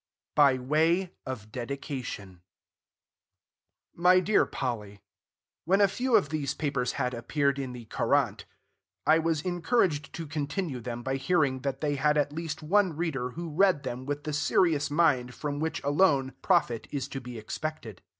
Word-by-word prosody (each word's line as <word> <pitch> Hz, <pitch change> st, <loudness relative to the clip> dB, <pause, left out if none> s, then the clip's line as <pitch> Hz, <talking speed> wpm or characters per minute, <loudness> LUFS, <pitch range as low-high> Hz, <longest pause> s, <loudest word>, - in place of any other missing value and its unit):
BY 140 Hz, -3 st, +5 dB
WAY 160 Hz, +8 st, +1 dB
OF 110 Hz, -5 st, -6 dB
DEDICATION 120 Hz, -, -6 dB, 1.5 s
MY 180 Hz, +2 st, +5 dB
DEAR 210 Hz, +3 st, +3 dB
POLLY, 105 Hz, -6 st, -4 dB, 0.6 s
When 190 Hz, +4 st, +3 dB
a 200 Hz, -, +6 dB
few 245 Hz, +5 st, 0 dB
of 190 Hz, -10 st, +3 dB
these 145 Hz, -2 st, -2 dB
papers 140 Hz, -5 st, -1 dB
had 125 Hz, 0 st, -1 dB
appeared 140 Hz, +3 st, 0 dB
in 130 Hz, -2 st, -4 dB
"The 120 Hz, -2 st, -9 dB
Courant," -, -, 0 dB, 0.6 s
I 155 Hz, +2 st, +5 dB
was 160 Hz, -2 st, 0 dB
encouraged 175 Hz, -, +1 dB
to 165 Hz, -, -5 dB
continue 150 Hz, 0 st, -3 dB
them 120 Hz, 0 st, -6 dB
by 135 Hz, +1 st, -1 dB
hearing 135 Hz, -2 st, +1 dB
that 135 Hz, 0 st, -3 dB
they 145 Hz, -2 st, 0 dB
had 150 Hz, +2 st, +2 dB
at 145 Hz, 0 st, +1 dB
least 160 Hz, -1 st, -5 dB
one 185 Hz, -1 st, +2 dB
reader 140 Hz, -7 st, -2 dB
who 165 Hz, +4 st, -6 dB
read 185 Hz, -3 st, +3 dB
them 130 Hz, 0 st, -5 dB
with 145 Hz, 0 st, -3 dB
the 150 Hz, -, -4 dB
serious 150 Hz, +1 st, +2 dB
mind 140 Hz, -6 st, +2 dB
from 145 Hz, -1 st, -3 dB
which 160 Hz, +1 st, -2 dB
alone 140 Hz, -3 st, +3 dB
profit 150 Hz, -, +1 dB
is 140 Hz, -2 st, -3 dB
to 135 Hz, -, -5 dB
be 125 Hz, -1 st, -8 dB
expected. 110 Hz, -, -6 dB
145 Hz, 160 wpm, -28 LUFS, 130-165 Hz, 1.5 s, a